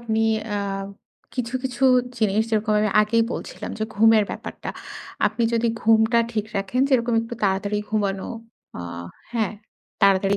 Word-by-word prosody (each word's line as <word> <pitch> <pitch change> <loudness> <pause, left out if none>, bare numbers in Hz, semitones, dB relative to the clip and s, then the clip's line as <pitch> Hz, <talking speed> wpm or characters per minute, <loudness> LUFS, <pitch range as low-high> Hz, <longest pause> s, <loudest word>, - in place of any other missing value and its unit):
আপনি 220 -1 0 0.3
আ - - 0 0.8
কিছু, 250 -1 -3
কিছু 255 0 -1 0.3
জিনিস 215 -1 +2
যেরকম 215 0 +1
আমি 215 - +2
আগেই 230 +2 +2
বলছিলাম - - -6
যে, 220 - 0
ঘুমের 220 0 +5
ব্যাপারটা। - - -6 0.6
আপনি 235 - -1
যদি 235 0 +2
ঘুমটা 225 +1 +4
ঠিক 215 -2 -1
রাখেন 195 +6 -1
যেরকম 240 -3 +2
একটু 230 +1 -6
তাড়াতাড়ি 200 +1 +1
ঘুমানো, 200 -3 -1 0.5
আ - - -4 0.5
হ্যাঁ, 220 -4 0 0.5
তাড়াতাড়ি 195 0 +4
220 Hz, 140 wpm, -23 LUFS, 205-235 Hz, 0.8 s, ঘুমের